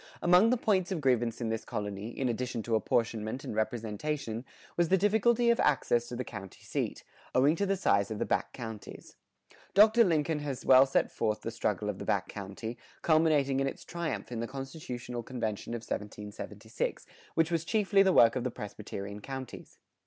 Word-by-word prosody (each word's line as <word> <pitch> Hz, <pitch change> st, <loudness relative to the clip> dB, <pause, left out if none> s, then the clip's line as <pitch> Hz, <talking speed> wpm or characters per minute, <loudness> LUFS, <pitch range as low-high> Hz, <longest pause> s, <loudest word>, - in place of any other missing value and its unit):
Among 180 Hz, +5 st, +6 dB
the 250 Hz, -, +3 dB
points 195 Hz, -5 st, +1 dB
of 185 Hz, -, -1 dB
grievance 120 Hz, -4 st, +1 dB
in 115 Hz, -, -1 dB
this 110 Hz, 0 st, -2 dB
colony, 105 Hz, +1 st, -4 dB
in 130 Hz, +2 st, -2 dB
addition 120 Hz, -1 st, -2 dB
to 115 Hz, -, -3 dB
apportionment 110 Hz, +1 st, 0 dB
and -, -, -5 dB
representation, 115 Hz, +2 st, -2 dB, 0.3 s
was 170 Hz, -2 st, +2 dB
the 190 Hz, -, +5 dB
difficulty 225 Hz, +4 st, +3 dB
of 235 Hz, -, +1 dB
access 120 Hz, -4 st, +2 dB
to 120 Hz, -, -6 dB
the 125 Hz, -, -2 dB
county 95 Hz, -5 st, -9 dB
seat, -, -, -3 dB, 0.3 s
owing 140 Hz, +5 st, +5 dB
to 200 Hz, -, 0 dB
the 195 Hz, 0 st, +1 dB
size 100 Hz, -, +2 dB
of 110 Hz, -, -4 dB
the -, -, -1 dB
back -, -, 0 dB
counties. 110 Hz, -3 st, -8 dB, 0.6 s
Dr. 220 Hz, +3 st, +7 dB
Lincoln 160 Hz, -4 st, +1 dB
has 140 Hz, -3 st, -5 dB
well 130 Hz, +1 st, +7 dB
set 135 Hz, -, +1 dB
forth 105 Hz, 0 st, -1 dB
the 115 Hz, -, -4 dB
struggle 105 Hz, -3 st, -1 dB
of 105 Hz, -2 st, -3 dB
the -, -, -5 dB
back 95 Hz, -1 st, 0 dB
country, 105 Hz, +4 st, -6 dB, 0.2 s
culminating 155 Hz, -4 st, +3 dB
in 135 Hz, -, +1 dB
its -, -, -6 dB
triumph 170 Hz, -9 st, -4 dB
in 120 Hz, -, -3 dB
the 115 Hz, -, -2 dB
constitutional 130 Hz, -3 st, -6 dB
convention 115 Hz, -2 st, -4 dB
of 115 Hz, -, -5 dB
1776, 105 Hz, -1 st, -5 dB, 0.3 s
which 165 Hz, +1 st, +2 dB
was 165 Hz, -2 st, +1 dB
chiefly 200 Hz, +1 st, +3 dB
the 190 Hz, -1 st, +5 dB
work 115 Hz, -9 st, +6 dB
of 130 Hz, -, -1 dB
the 125 Hz, -, 0 dB
Presbyterian 100 Hz, -2 st, -7 dB
counties. 130 Hz, +2 st, -8 dB
125 Hz, 185 wpm, -30 LUFS, 110-160 Hz, 0.6 s, Dr